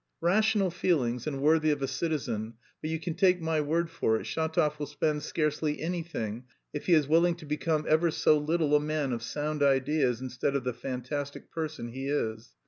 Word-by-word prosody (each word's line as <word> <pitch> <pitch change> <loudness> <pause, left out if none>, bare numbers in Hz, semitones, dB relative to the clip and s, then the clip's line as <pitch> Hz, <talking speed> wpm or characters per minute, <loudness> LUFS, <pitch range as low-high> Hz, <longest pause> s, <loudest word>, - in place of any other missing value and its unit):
"Rational 200 +2 +3
feelings 140 -9 0
and 135 -3 -3
worthy 155 +1 +4
of 145 -2 0
a - - +1
citizen, 130 -7 -2 0.3
but 155 - -3
you 160 0 -1
can 165 +1 -3
take 180 +1 +3
my 160 -2 0
word 165 +3 0
for 110 0 +1
it, - - -7
Shatov 160 -2 0
will 145 - -3
spend 150 +1 -1
scarcely 150 -1 -1
anything, 155 -10 -3 0.3
if 150 - -5
he 175 - +6
is 150 -3 +3
willing 170 +3 +4
to 165 - -12
become 155 +1 -1
ever 160 +2 +4
so 155 - +4
little 150 0 +1
a - - +6
man 150 -3 -1
of 115 - -3
sound 150 +5 -3
ideas 135 -2 +2
instead 130 +2 -2
of 140 - 0
the 125 -1 -1
fantastic 130 +3 -5
person 155 -7 -4
he 135 +3 -5
is. 115 -5 -2
150 Hz, 195 wpm, -29 LUFS, 135-160 Hz, 0.3 s, he